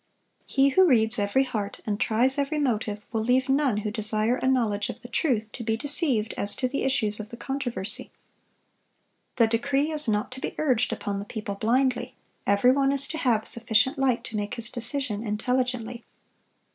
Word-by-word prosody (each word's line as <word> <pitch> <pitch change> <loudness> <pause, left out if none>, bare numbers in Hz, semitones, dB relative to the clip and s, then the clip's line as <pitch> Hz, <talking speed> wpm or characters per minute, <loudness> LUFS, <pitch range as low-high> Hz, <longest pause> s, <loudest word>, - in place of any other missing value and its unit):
He 275 0 +3
who 375 +6 +4
reads 225 -4 +4
every 205 +7 +1
heart, 215 -6 -5
and 210 -1 -2
tries 255 +5 +2
every 285 +2 -1
motive, 215 -7 -2
will 220 -1 -1
leave 250 +3 +1
none 270 -4 +1
who 210 0 -3
desire 215 +1 +5
a 260 - -2
knowledge 225 -6 0
of 235 - -8
the 245 - -10
truth, 235 -4 -1
to 235 - -7
be 220 0 -1
deceived 270 -5 +1
as 200 0 +2
to 255 - -1
the 275 +2 -3
issues 220 -6 0
of 215 0 -7
the 235 - -10
controversy. 245 -7 -3 1.3
The 230 - +4
decree 275 +7 0
is 300 -3 +2
not 210 +2 -1
to 255 - -9
be - - -5
urged 255 -6 +1
upon 200 -1 -4
the 200 - -7
people 210 -1 -6
blindly. 250 +5 0 0.3
Every 200 +5 +4
one 275 0 +2
is 275 0 +1
to 315 - -4
have 230 -6 +1
sufficient 235 +4 +2
light 250 -3 +1
to 225 - -7
make 205 -1 -3
his 235 0 -3
decision 240 -2 -3
intelligently. 245 +1 -2
240 Hz, 185 wpm, -25 LUFS, 215-265 Hz, 1.3 s, desire